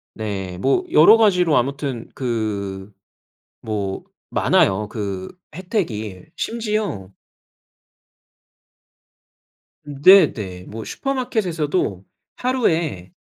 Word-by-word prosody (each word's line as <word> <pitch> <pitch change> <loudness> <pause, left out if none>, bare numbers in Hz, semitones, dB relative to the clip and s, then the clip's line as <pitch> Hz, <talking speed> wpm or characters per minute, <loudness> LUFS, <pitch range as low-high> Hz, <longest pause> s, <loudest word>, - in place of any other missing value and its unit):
네 95 -4 -4
뭐 135 +7 +2
여러 205 +9 +8
가지로 180 -8 +3
아무튼 135 -2 -2
그 105 -5 -3 0.7
뭐 100 -3 -3 0.3
많아요, 100 +2 +2
그 100 -4 -4 0.3
혜택이. 115 - -3
심지어 215 - -3 2.8
음 145 -2 -8
네 185 -3 +8
네. 90 -4 -7
뭐 110 +3 -8
슈퍼마켓에서도 180 - -2 0.3
하루에 165 - -1
125 Hz, 165 characters per minute, -21 LUFS, -, 2.8 s, 여러